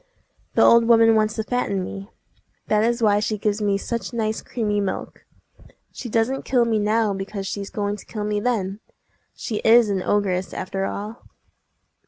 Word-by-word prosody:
The - - +5
old 235 0 +6
woman 225 -1 +6
wants 215 0 +1
to 220 - -2
fatten 210 -5 -1
me! 195 +2 -7 0.6
That 210 0 +3
is 235 +1 0
why 205 -1 +4
she 215 +1 -1
gives 210 +1 -1
me 200 -1 +1
such 235 +4 -4
nice 220 -2 -1
creamy 210 -4 -2
milk. 195 -1 -5 0.7
She 245 - -7
doesn't 230 +5 0
kill 245 -2 +2
me 225 -2 +1
now 215 0 +1
because 195 +1 -5
she's 200 0 -4
going 205 0 -2
to - - -13
kill 210 -2 -5
me 210 0 -1
then! 205 -4 -1 0.6
She 220 - -4
is 225 0 +5
an 190 -2 -1
ogress, 190 -2 0
after 195 +1 -3
all!" 210 +4 -6
210 Hz, 175 wpm, -22 LUFS, 200-230 Hz, 0.7 s, old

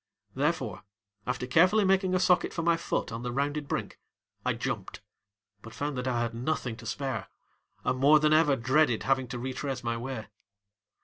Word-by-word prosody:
Therefore, 135 - -1 0.4
after - - -2
carefully 185 +10 +4
making 190 -1 +3
a - - +3
socket 180 -1 +3
for 165 - -2
my 170 0 +4
foot 165 - -2
on 115 +1 -5
the 120 0 -3
rounded 145 +3 -1
brink, - - -4 0.4
I - - +1
jumped, - - -4 0.6
but 115 - -11
found 145 0 -2
that 125 +1 -3
I 120 -2 0
had 115 -1 -2
nothing 125 -1 -2
to 115 - -10
spare 130 -2 -3 0.6
and 130 - 0
more 145 +3 +6
than 150 0 +3
ever 155 -3 +5
dreaded 130 0 +2
having 130 -1 +1
to 120 +1 -5
retrace 130 +1 -4
my 115 -1 -1
way. 120 -2 -5
135 Hz, 180 wpm, -29 LUFS, 120-155 Hz, 0.6 s, more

